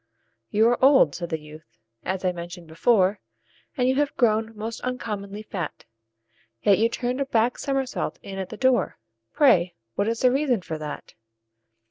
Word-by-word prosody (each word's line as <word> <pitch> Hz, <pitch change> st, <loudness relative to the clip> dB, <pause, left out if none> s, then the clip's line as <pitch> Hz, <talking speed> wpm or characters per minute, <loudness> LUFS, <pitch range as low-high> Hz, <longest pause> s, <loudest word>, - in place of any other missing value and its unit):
"You 220 Hz, +2 st, +4 dB
are 245 Hz, +1 st, 0 dB
old," 265 Hz, -, +6 dB
said 170 Hz, -1 st, -5 dB
the 160 Hz, -2 st, -2 dB
youth, 150 Hz, -2 st, -14 dB, 0.3 s
"as 190 Hz, 0 st, -3 dB
I 180 Hz, -, +3 dB
mentioned 175 Hz, 0 st, -8 dB
before, 190 Hz, +4 st, +2 dB, 0.6 s
And 250 Hz, -1 st, +2 dB
you 260 Hz, +1 st, +2 dB
have 290 Hz, 0 st, 0 dB
grown 220 Hz, -2 st, +1 dB
most 225 Hz, +2 st, -5 dB
uncommonly 210 Hz, -5 st, -4 dB
fat; 180 Hz, -7 st, -6 dB, 0.8 s
Yet 200 Hz, -2 st, +5 dB
you 225 Hz, +1 st, +3 dB
turned 250 Hz, +3 st, -2 dB
a -, -, +1 dB
back 235 Hz, 0 st, +1 dB
somersault 270 Hz, -2 st, -2 dB
in 195 Hz, -1 st, -6 dB
at 190 Hz, -1 st, -4 dB
the -, -, -8 dB
door 260 Hz, -1 st, +2 dB, 0.3 s
Pray 185 Hz, -, +4 dB, 0.2 s
what 200 Hz, -, 0 dB
is 230 Hz, 0 st, -1 dB
the 255 Hz, -, +5 dB
reason 260 Hz, -7 st, +1 dB
for 160 Hz, -3 st, -5 dB
that?" 150 Hz, -1 st, -7 dB
215 Hz, 170 wpm, -25 LUFS, 180-250 Hz, 0.8 s, old